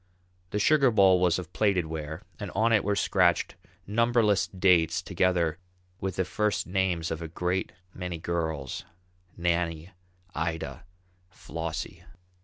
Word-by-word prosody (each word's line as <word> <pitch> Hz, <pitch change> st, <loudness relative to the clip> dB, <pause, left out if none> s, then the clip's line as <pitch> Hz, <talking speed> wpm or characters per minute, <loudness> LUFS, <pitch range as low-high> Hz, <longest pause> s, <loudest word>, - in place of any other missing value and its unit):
The 105 Hz, -, -2 dB
sugar 140 Hz, +5 st, +4 dB
bowl 95 Hz, -5 st, +5 dB
was 90 Hz, -2 st, +3 dB
of 90 Hz, -1 st, -7 dB
plated 100 Hz, -5 st, +2 dB
ware 80 Hz, +2 st, -6 dB, 0.2 s
and 100 Hz, -3 st, -5 dB
on 115 Hz, +3 st, +3 dB
it 105 Hz, -, +4 dB
were 100 Hz, +1 st, +1 dB
scratched 90 Hz, -4 st, +2 dB, 0.3 s
numberless 115 Hz, -1 st, +2 dB
dates 90 Hz, -4 st, +3 dB
together 85 Hz, -3 st, 0 dB, 0.4 s
with 95 Hz, -1 st, -3 dB
the 95 Hz, -, 0 dB
first 105 Hz, +2 st, 0 dB
names 90 Hz, -3 st, 0 dB
of 80 Hz, 0 st, -3 dB
a 80 Hz, -, -4 dB
great 90 Hz, +3 st, -2 dB, 0.2 s
many 90 Hz, -2 st, -5 dB
girls, 80 Hz, -5 st, -3 dB, 0.5 s
"Nannie," 85 Hz, 0 st, -1 dB, 0.4 s
"Ida," 80 Hz, +2 st, -3 dB, 0.4 s
"Flossie." 80 Hz, -1 st, -6 dB
90 Hz, 130 wpm, -28 LUFS, 85-100 Hz, 0.5 s, bowl